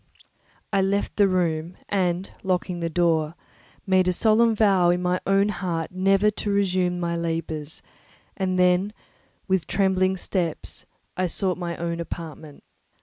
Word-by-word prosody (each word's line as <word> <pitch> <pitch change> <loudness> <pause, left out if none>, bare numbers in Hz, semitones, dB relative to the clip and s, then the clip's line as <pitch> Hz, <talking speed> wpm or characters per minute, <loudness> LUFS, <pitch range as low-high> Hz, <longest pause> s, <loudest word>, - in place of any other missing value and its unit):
I 195 - +3
left 200 +1 0
the 205 -2 +4
room, 175 -2 -1
and 185 -2 -1
locking 180 -2 -1
the 170 -1 -2
door, 165 -2 +1 0.5
made 185 -2 +3
a 180 - +2
solemn 225 +3 +3
vow 195 -5 +4
in 175 +1 +2
my 180 0 0
own 195 +1 +3
heart 175 -5 -3
never 195 +3 +3
to 210 0 -4
resume 185 -3 +1
my 170 -1 -1
labours; 165 -2 -4 0.5
and 185 -1 -1
then, 180 +3 +3 0.5
with 190 -3 0
trembling 190 -1 +2
steps, 175 -4 -4 0.3
I 185 0 0
sought 180 +2 -1
my 170 -1 -4
own 170 0 -3
apartment. 160 -3 -8
180 Hz, 145 wpm, -24 LUFS, 170-195 Hz, 0.5 s, the